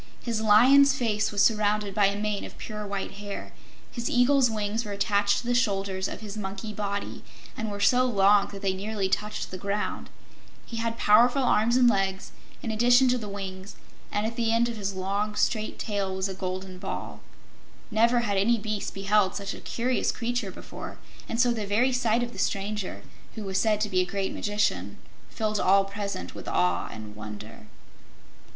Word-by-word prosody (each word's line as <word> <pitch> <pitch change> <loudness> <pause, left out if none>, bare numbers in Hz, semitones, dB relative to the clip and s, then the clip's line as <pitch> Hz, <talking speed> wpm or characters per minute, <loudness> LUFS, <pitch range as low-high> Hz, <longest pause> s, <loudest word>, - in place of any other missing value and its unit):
His 230 -2 -1
lion's 265 +6 +6
face 220 -5 0
was 205 -1 +3
surrounded 210 -2 +2
by 200 0 +4
a 200 +1 -2
mane 210 -1 -1
of - - -9
pure 210 -1 -6
white 200 -1 -4
hair; 200 0 -7 0.4
his 235 -1 -3
eagle's 245 +1 +4
wings 215 +1 -2
were 205 -2 -5
attached 200 0 +2
to 240 - -4
the 245 - +1
shoulders 195 -5 0
of - - -7
his 210 -1 -7
monkey 200 +1 -5
body 200 -1 -4 0.3
and 220 -1 -3
were 205 0 -5
so 250 +5 +4
long 200 -2 +4
that 200 0 -10
they 190 -1 +1
nearly 200 +1 -2
touched 210 +2 -2
the 185 - -6
ground; 200 +2 -3 0.6
he 230 - -7
had 230 0 -2
powerful 240 +6 +5
arms 235 0 +3
and 250 -1 +5
legs 195 -3 0 0.3
in 225 - -2
addition 245 +4 +5
to 250 0 +2
the 210 -2 -6
wings, 195 -1 -7 0.4
and 205 +1 0
at 230 +1 -3
the 230 -1 +1
end 230 +1 +3
of 235 - -4
his 200 -2 -3
long, 200 +3 -2
strong 215 0 0
tail 200 -3 -3
was 190 +1 -1
a 190 - -5
golden 185 0 -5
ball. - - -6 0.7
Never 235 +3 +3
had 205 -4 -1
any 230 +5 +3
beast 215 -1 -4
beheld 195 0 +2
such 200 -1 -4
a - - -9
curious 250 +2 0
creature 240 -3 -2
before, 185 - -9 0.3
and 230 - -2
so 245 0 +4
the 220 -3 -3
very 235 +6 +2
sight 240 -1 +2
of 240 - -5
the 195 - -8
stranger, 200 0 -2 0.3
who 220 - -5
was 190 -1 -1
said 215 -2 +2
to 215 - +1
be 185 -2 +1
a 185 - +3
great 195 -1 -2
magician, 105 - -1 0.3
filled 215 - -1
all 195 +1 +4
present 200 - -5
with - - -10
awe 90 0 +1
and 105 -1 -9
wonder. 105 0 -9
210 Hz, 190 wpm, -27 LUFS, 195-230 Hz, 0.7 s, lion's